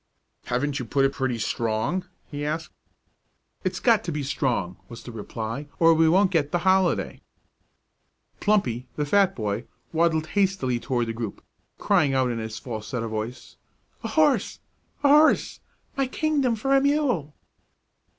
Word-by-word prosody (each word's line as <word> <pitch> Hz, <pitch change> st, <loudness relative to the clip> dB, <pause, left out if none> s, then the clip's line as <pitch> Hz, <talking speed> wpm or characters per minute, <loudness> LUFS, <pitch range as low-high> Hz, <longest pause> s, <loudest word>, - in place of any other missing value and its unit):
"Haven't 140 Hz, +3 st, -1 dB
you 125 Hz, -, -4 dB
put 135 Hz, +4 st, +2 dB
it 135 Hz, -, +1 dB
pretty 130 Hz, -3 st, -1 dB
strong?" 115 Hz, +11 st, -1 dB, 0.2 s
he 145 Hz, 0 st, -6 dB
asked. 155 Hz, +1 st, -3 dB, 0.9 s
"It's 185 Hz, -1 st, -2 dB
got 230 Hz, -4 st, +3 dB
to 170 Hz, -, -2 dB
be 150 Hz, -2 st, -3 dB
strong," 125 Hz, -, -1 dB
was 115 Hz, -, -10 dB
the 120 Hz, -, -8 dB
reply, 115 Hz, +5 st, -5 dB
"or 165 Hz, 0 st, +6 dB
we 160 Hz, 0 st, +4 dB
won't 190 Hz, +3 st, +4 dB
get 150 Hz, -5 st, +1 dB
the 175 Hz, -, +2 dB
holiday." 190 Hz, -1 st, +2 dB, 1.2 s
Plumpy, 130 Hz, -, +1 dB
the 150 Hz, -, -1 dB
fat 195 Hz, +5 st, +3 dB
boy, 105 Hz, -1 st, -3 dB, 0.3 s
waddled 160 Hz, -1 st, +2 dB
hastily 190 Hz, -12 st, +1 dB
toward 120 Hz, -1 st, -1 dB
the 115 Hz, -, -4 dB
group, 115 Hz, -3 st, -6 dB, 0.3 s
crying 140 Hz, -3 st, +2 dB
out 130 Hz, -2 st, +2 dB
in 115 Hz, -, -3 dB
his 110 Hz, 0 st, -5 dB
falsetto 115 Hz, 0 st, -5 dB
voice: 110 Hz, +3 st, -6 dB, 0.5 s
"A -, -, -2 dB
horse! 300 Hz, -3 st, +2 dB, 0.5 s
a -, -, +5 dB
horse! 300 Hz, +2 st, +4 dB, 0.4 s
my 275 Hz, -1 st, 0 dB
kingdom 280 Hz, -3 st, +1 dB
for 270 Hz, +5 st, +1 dB
a 270 Hz, -, +5 dB
mule!" 270 Hz, -, 0 dB
145 Hz, 150 wpm, -25 LUFS, 120-190 Hz, 1.2 s, or